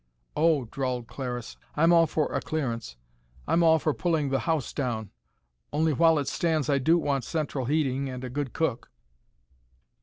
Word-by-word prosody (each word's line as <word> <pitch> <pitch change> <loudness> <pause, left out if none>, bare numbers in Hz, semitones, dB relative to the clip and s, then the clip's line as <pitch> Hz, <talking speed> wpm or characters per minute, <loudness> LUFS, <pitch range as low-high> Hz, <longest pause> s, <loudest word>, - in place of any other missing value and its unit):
"Oh," 155 -4 +3
drawled 125 0 -3
Clariss. 125 -2 -6 0.2
"I'm 165 +3 +5
all 165 -1 +6
for 155 -1 -1
a - - 0
clearance. 115 - -3 0.5
I'm 170 - +3
all 160 -1 +6
for 155 -1 0
pulling 160 -5 0
the 135 0 +1
house 160 -5 0
down. 115 -7 -3 0.6
Only 155 +1 +2
while 165 +2 +4
it 140 -2 -1
stands 155 -4 0
I 140 - +3
do 160 +6 +4
want 140 -5 0
central 145 -2 -2
heating 140 -1 0
and 130 0 -6
a 130 - -4
good 140 -1 -3
cook." 135 -7 -2
145 Hz, 170 wpm, -27 LUFS, 130-160 Hz, 0.6 s, all